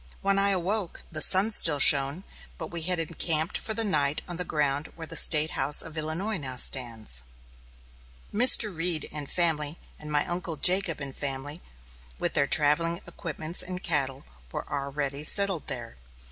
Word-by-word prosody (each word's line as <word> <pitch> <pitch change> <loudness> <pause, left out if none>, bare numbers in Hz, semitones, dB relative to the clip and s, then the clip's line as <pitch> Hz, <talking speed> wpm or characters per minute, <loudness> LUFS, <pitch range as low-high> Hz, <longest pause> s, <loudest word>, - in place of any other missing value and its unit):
When 195 0 +1
I 200 0 +1
awoke, 190 +1 -3
the 155 -1 -2
sun 195 +7 +6
still 165 -8 +6
shone, 140 +4 +4 0.3
but 160 - -9
we 170 -1 -6
had 180 +2 0
encamped 165 0 -1
for 220 - -5
the 225 - 0
night 150 -8 -1
on 175 -1 -7
the 180 - -3
ground 145 -2 -2
where 165 - -8
the 165 +1 -8
State 155 -1 +5
House 145 +2 +3
of 160 - -11
Illinois 165 +7 -4
now 135 -5 -6
stands. 115 - +2 1.1
Mr. 215 -3 +6
Reed 165 -1 -1
and 145 -2 -6
family, 160 -3 -1 0.2
and 150 0 -10
my 145 0 0
uncle 175 -2 -5
Jacob 180 0 +1
and 140 -1 -8
family, 145 +3 -6 0.6
with - - -3
their 140 -1 +1
travelling 165 +4 0
equipments 160 +1 -4
and 180 0 -7
cattle, 135 -4 -3 0.3
were - - -7
already 140 0 -5
settled 195 0 +2
there. 115 - -7
155 Hz, 165 wpm, -25 LUFS, 145-180 Hz, 1.1 s, sun